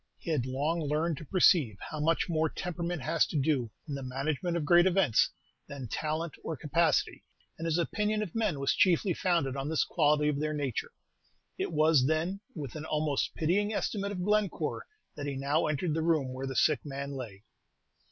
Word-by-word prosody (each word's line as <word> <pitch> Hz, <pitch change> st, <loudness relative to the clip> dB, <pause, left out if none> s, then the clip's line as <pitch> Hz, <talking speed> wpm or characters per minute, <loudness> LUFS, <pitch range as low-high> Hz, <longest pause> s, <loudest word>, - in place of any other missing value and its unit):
He 170 Hz, -, -5 dB
had 135 Hz, -5 st, 0 dB
long 145 Hz, +6 st, -1 dB
learned 155 Hz, +2 st, 0 dB
to 155 Hz, -, -8 dB
perceive 155 Hz, -, +4 dB
how 155 Hz, -, -6 dB
much 160 Hz, +2 st, +1 dB
more 160 Hz, -2 st, +1 dB
temperament 175 Hz, -3 st, -4 dB
has 165 Hz, +1 st, +2 dB
to -, -, -3 dB
do, 135 Hz, -4 st, +1 dB, 0.2 s
in 145 Hz, -, -4 dB
the 140 Hz, -, -4 dB
management 140 Hz, +6 st, -2 dB
of 155 Hz, -, -2 dB
great 175 Hz, +3 st, +6 dB
events, 180 Hz, -, +3 dB, 0.4 s
than 140 Hz, -3 st, -7 dB
talent 155 Hz, +6 st, -2 dB
or 160 Hz, -, -4 dB
capacity, 160 Hz, +4 st, +1 dB, 0.4 s
and 165 Hz, -, -3 dB
his 165 Hz, 0 st, +1 dB
opinion 210 Hz, +5 st, 0 dB
of 185 Hz, -, -7 dB
men 210 Hz, -10 st, 0 dB
was 140 Hz, -, +2 dB
chiefly 180 Hz, +1 st, +3 dB
founded 165 Hz, -7 st, 0 dB
on 135 Hz, +1 st, -3 dB
this 160 Hz, -, +2 dB
quality 150 Hz, -2 st, +2 dB
of 145 Hz, -1 st, 0 dB
their 155 Hz, 0 st, -1 dB
nature. 140 Hz, -5 st, -3 dB, 0.7 s
It -, -, -1 dB
was, 155 Hz, -4 st, +4 dB
then, 165 Hz, +5 st, 0 dB, 0.2 s
with 140 Hz, -8 st, -6 dB
an 155 Hz, 0 st, -5 dB
almost 150 Hz, -3 st, -1 dB
pitying 205 Hz, +7 st, +1 dB
estimate 200 Hz, -1 st, -2 dB
of 180 Hz, -3 st, -3 dB
Glenoore 210 Hz, -1 st, 0 dB, 0.3 s
that 145 Hz, -1 st, -5 dB
he 140 Hz, -, -3 dB
now 140 Hz, +4 st, +1 dB
entered 155 Hz, +2 st, -1 dB
the 160 Hz, -, 0 dB
room 155 Hz, -6 st, +1 dB
where 130 Hz, +1 st, -4 dB
the 135 Hz, -, -5 dB
sick 155 Hz, +2 st, +3 dB
man 140 Hz, -1 st, -5 dB
lay. 115 Hz, -8 st, -7 dB
155 Hz, 190 wpm, -30 LUFS, 140-170 Hz, 0.7 s, great